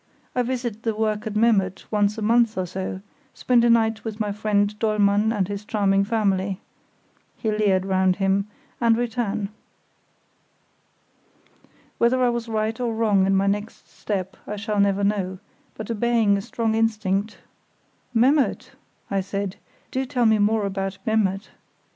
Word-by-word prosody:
I 250 - +1
visit 240 -3 -3
the 225 -2 -1
work 215 -1 -1
at 215 - -5
Memmert 210 -4 +2
once 210 0 +1
a 220 - -3
month 230 0 +3
or 185 - 0
so, 185 +1 -5 0.3
spend 245 -2 +2
a 240 - +4
night 225 -1 +2
with 220 -1 -6
my 210 -2 -1
friend 205 0 +1
Dollmann 210 -1 +2
and 200 -5 0
his 205 +1 -5
charming 200 -2 +1
family" 195 -3 0 0.8
(he 220 - -1
leered 200 -3 +1
round 190 -1 +2
him), 195 +1 +1 0.3
"and 230 -1 +4
return." 220 -4 -2 2.5
Whether 240 +2 +3
I 245 - +4
was 235 -1 -3
right 220 +1 -1
or 235 -2 -1
wrong 205 -4 +3
in 195 - +3
my 195 +1 +2
next 205 +2 -3
step 190 -3 -4
I 210 - -4
shall 210 0 -2
never 200 0 +2
know, 195 -2 0 0.4
but 220 +1 -6
obeying 230 -2 +2
a 200 - -1
strong 225 +2 -2
instinct, 215 -2 0 0.7
"Memmert," 260 +5 +2 0.4
I 195 -1 +1
said; 200 0 -4 0.3
"do 260 0 -2
tell 250 -3 +1
me 220 -1 +4
more 210 +1 +2
about 195 -1 -3
Memmert. 205 -3 0
210 Hz, 155 wpm, -23 LUFS, 195-225 Hz, 2.5 s, a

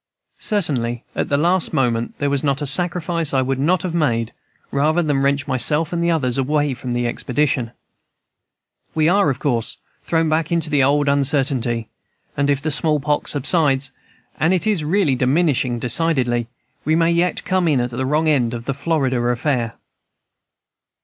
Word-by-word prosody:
Certainly 130 - -1
at - - -2
the 140 - +2
last 175 +4 +1
moment 120 -3 0
there 145 -1 -1
was 140 0 0
not 140 -2 0
a 145 - -3
sacrifice 170 0 0
I 130 - +3
would 130 0 -2
not 175 +7 +1
have 180 -3 -3
made 120 -9 0 0.4
rather 155 +5 +1
than 145 -3 0
wrench 140 0 +1
myself 150 +5 +1
and 170 0 -1
others 135 -6 0
away 145 +1 0
from 125 -1 -5
the 120 0 -1
expedition. 125 0 -1 1.3
We 155 -1 +3
are, 195 -1 +3
of 135 - -1
course, 125 -3 -2 0.2
thrown 165 -1 0
back 155 +1 0
into 165 -2 0
the 145 -2 +3
old 145 +2 +2
uncertainty, 135 -5 +1 0.5
and 140 0 0
if 140 -1 0
the 155 - -1
small 150 +1 +1
pox 150 +1 -1
subsides 140 -2 +1 0.5
(and 165 +4 +3
it 180 - 0
is 205 -7 +1
really 165 -2 +1
diminishing 130 -1 +1
decidedly) 125 -2 +1 0.4
we 155 +2 +1
may 165 +1 +3
yet 170 +1 0
come 185 -2 +1
in 145 -5 +2
at 120 0 -2
the 125 +2 -3
wrong 150 +4 +1
end 125 -6 +1
of 115 0 -7
the 135 - -1
Florida 135 -4 0
affair." 120 -1 -1
145 Hz, 170 wpm, -20 LUFS, 130-160 Hz, 1.3 s, I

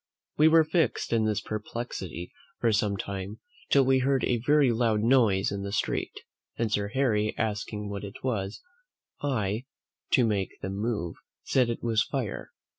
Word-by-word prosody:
We 155 - +6
were 160 0 +6
fixed 160 -5 0
in 110 -1 +3
this 105 -1 0
perplexity 105 - -5 0.3
for 115 - +3
some 105 -1 +1
time, 100 +2 -5 0.3
till 140 -2 +5
we 130 0 +4
heard 135 0 +1
a 120 - +1
very 145 -2 +4
loud 115 -2 +2
noise 110 -5 +3
in 100 0 -3
the 100 0 -4
street, 100 - -2 0.4
and 115 -2 0
Sir 100 -1 +1
Harry 110 -3 +1
asking 105 -1 -2
what 100 0 -5
it 100 0 -9
was, 105 -6 -2 0.6
I, 115 -4 -1 0.5
to 125 - +5
make 100 -4 -1
them 95 - -3
move, 105 -6 -2 0.3
said 125 -3 +2
it 115 - -3
was 115 -2 +2
fire. 120 -2 -3
110 Hz, 165 wpm, -28 LUFS, 100-125 Hz, 0.6 s, We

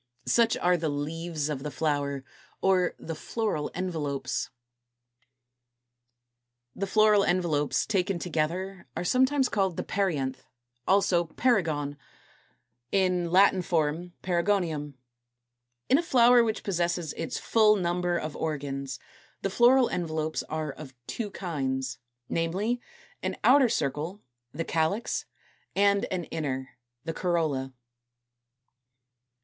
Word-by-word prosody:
Such 230 -1 +3
are 180 0 +3
the 160 -2 -1
leaves 155 +1 -3
of 145 -3 -3
the 150 - -4
Flower, 145 -3 -1 0.4
or 185 -2 +2
the 165 - -6
Floral 205 -3 -2
Envelopes. 145 -7 -2 2.2
229. - - -16
=The 195 - 0
Floral 215 0 +5
Envelopes=, 170 -6 +1
taken 195 -2 0
together, 180 +3 -2
are - - -1
sometimes 260 +6 +3
called 190 -7 0
the - - -1
PERIANTH, 140 -10 -1 0.4
also 185 -3 +3
Perigone, 160 - 0 0.9
in 180 -3 +2
Latin 190 +1 +5
form 170 0 -1
Perigonium. 170 -5 0 0.9
In 270 - +5
a - - +2
flower 245 -6 +5
which 220 -1 -2
possesses 175 -3 -1
its 165 - -4
full 215 -2 +4
number 175 -2 0
of 155 -2 -4
organs, 140 -4 -3 0.5
the 195 - 0
floral 245 +4 +5
envelopes 160 -2 -2
are 155 -1 -2
of 135 -2 -11
two 220 - -4
kinds, 135 -9 -3 0.3
namely, 195 +9 -1 0.4
an - - -3
outer 265 -1 +6
circle, 160 - -2 0.3
the 165 +4 -4
CALYX, 165 +8 0 0.5
and 200 0 +3
an 185 -2 -3
inner, 135 -5 -3 0.3
the 165 +1 -3
COROLLA. 155 -8 -1
175 Hz, 115 wpm, -28 LUFS, 150-195 Hz, 2.2 s, outer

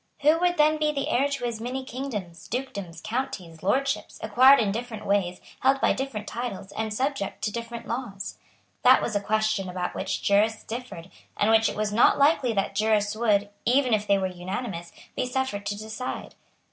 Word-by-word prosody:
Who 305 +3 +5
would 355 0 +2
then 305 +1 +4
be 305 0 +2
the 285 0 -2
heir 275 +1 +3
to 275 -3 -3
his 230 -2 -3
many 260 +3 -4
kingdoms, 210 -11 -6
dukedoms, 200 -10 -5
counties, 210 -9 -4
lordships, 275 +8 0
acquired 255 +6 +7
in 210 -4 +1
different 230 0 -5
ways, 190 -3 +1 0.2
held 270 +1 +3
by - - +3
different 255 -6 -4
titles 230 -6 -5
and 220 0 -3
subject 255 -3 -2
to 210 - 0
different 235 +1 -6
laws? 230 -5 -5 0.4
That - - +7
was 215 - -2
a 205 - +1
question 215 -2 0
about 180 0 -3
which - - -3
jurists 210 +2 +2
differed, 225 -7 -7 0.3
and 210 +2 +3
which 225 0 +5
it - - -5
was 210 -1 -1
not 230 - +5
likely 280 -3 +4
that 200 -1 -1
jurists 210 0 +1
would, 210 -3 +2
even 255 0 +3
if 210 -1 +1
they 200 - +4
were 190 - -1
unanimous, 185 0 -5 0.2
be - - -1
suffered 250 -6 -2
to 205 - -2
decide. 220 +4 -5
220 Hz, 185 wpm, -26 LUFS, 200-260 Hz, 0.4 s, acquired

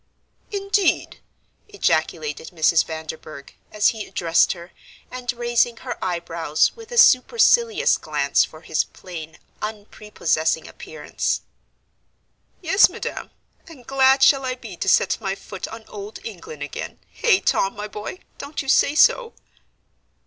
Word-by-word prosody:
"Indeed!" 395 -2 0 0.5
ejaculated 160 - -1
Mrs. 165 -1 +3
Vanderburgh, 160 -2 -8 0.2
as 210 -1 +3
he 220 -2 -5
addressed 165 -1 +2
her, 175 0 -12 0.4
and 250 -1 -3
raising 240 -1 +1
her 245 0 -6
eyebrows 170 -3 0
with 455 0 -13
a 480 - -4
supercilious 465 - +5
glance - - +1
for - - -9
his - - 0
plain, 160 -3 -10 0.2
unprepossessing 205 -7 -2
appearance. 155 -1 -4 1.2
"Yes, 385 +4 +5
Madam, - - -6 0.4
and 275 -7 -14
glad 265 0 +4
shall 275 -2 +5
I 255 -1 -2
be 225 -7 -10
to 190 - -1
set - - +3
my 195 0 -2
foot 195 -1 -8
on 225 0 -10
Old 205 +1 -8
England 170 -8 -8
again 145 - -6
Hey, 435 -6 +3
Tom, 195 - +1
my 210 +1 -5
boy, 210 - -7 0.2
don't 285 +1 -5
you 270 - -6
say 280 +2 +4
so?" 465 +8 +4
215 Hz, 130 wpm, -22 LUFS, 170-275 Hz, 1.2 s, supercilious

